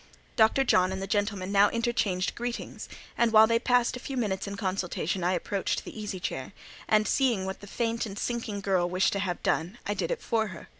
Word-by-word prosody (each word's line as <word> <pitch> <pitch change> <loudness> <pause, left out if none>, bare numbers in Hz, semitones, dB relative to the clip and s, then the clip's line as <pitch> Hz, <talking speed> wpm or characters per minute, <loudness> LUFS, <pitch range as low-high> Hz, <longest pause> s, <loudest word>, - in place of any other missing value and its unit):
Dr. 225 +5 +4
John 185 -7 +3
and 190 - -3
the 195 - -3
gentleman 200 -1 -1
now 200 0 +5
interchanged 230 -6 0
greetings; 240 0 -5 0.3
and 235 -1 +2
while 220 0 +8
they 230 +1 +2
passed 245 0 +2
a - - -6
few 265 +1 -5
minutes 200 -5 -1
in 200 0 -5
consultation, 185 -2 -2
I 180 +1 +2
approached 190 +2 -1
the - - -9
easy 210 -4 -5
chair, 135 -1 -4 0.3
and 215 -1 +3
seeing 235 -8 +2
what 190 0 -5
the 205 - -11
faint 230 +1 -1
and 200 -1 -8
sinking 225 -4 -3
girl 185 -3 +1
wished 185 +2 +2
to 200 - -1
have 185 -3 -3
done, 175 +8 0
I 205 - 0
did - - -2
it - - -3
for 225 -2 +1
her. 180 -5 -10
205 Hz, 215 wpm, -28 LUFS, 190-230 Hz, 0.3 s, while